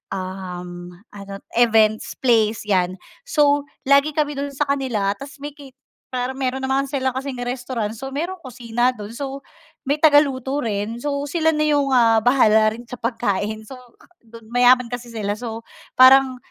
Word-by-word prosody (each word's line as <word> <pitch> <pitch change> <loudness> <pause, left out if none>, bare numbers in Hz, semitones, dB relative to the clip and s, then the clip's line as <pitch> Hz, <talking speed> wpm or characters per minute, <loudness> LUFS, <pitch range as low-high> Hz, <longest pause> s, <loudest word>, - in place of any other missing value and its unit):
um, 180 -2 -7 0.2
ano 200 -1 -9
events 220 -2 +3
place 225 -4 +2
yan. 185 -2 +1 0.3
So, 290 -9 +2 0.2
lagi 280 +3 +3
kami 295 -1 -1
dun 280 0 -4
sa 295 - +1
kanila 250 -8 0
tapos 275 +1 -9
may 295 - -5
cate 275 -3 -15 0.4
pero 255 +1 -2
meron 265 0 -2
naman 265 +1 0
sila 265 -1 -1
kasing 260 0 -5
restaurant 245 -3 -3
so 270 +3 -7
may 320 +6 -2 0.2
kusina 245 0 -1
dun 210 -3 -9
so, 270 +3 -6 0.4
may 285 +2 -1
taga-luto 290 -3 +3
rin 220 +1 -3
so 285 0 -2
sila 320 +2 +1
na 305 -1 +1
yung, 290 -2 +2
ah, 230 -4 +4
bahala 220 -3 +4
rin 240 - -11
sa 245 0 -10
pagkain 220 -2 -2
so 240 - -10 0.8
mayaman 250 +1 +5
kasi 245 0 -6
sila 210 -3 -3
so 225 +1 -7 0.3
parang 260 0 +7
250 Hz, 155 wpm, -21 LUFS, 220-275 Hz, 0.8 s, parang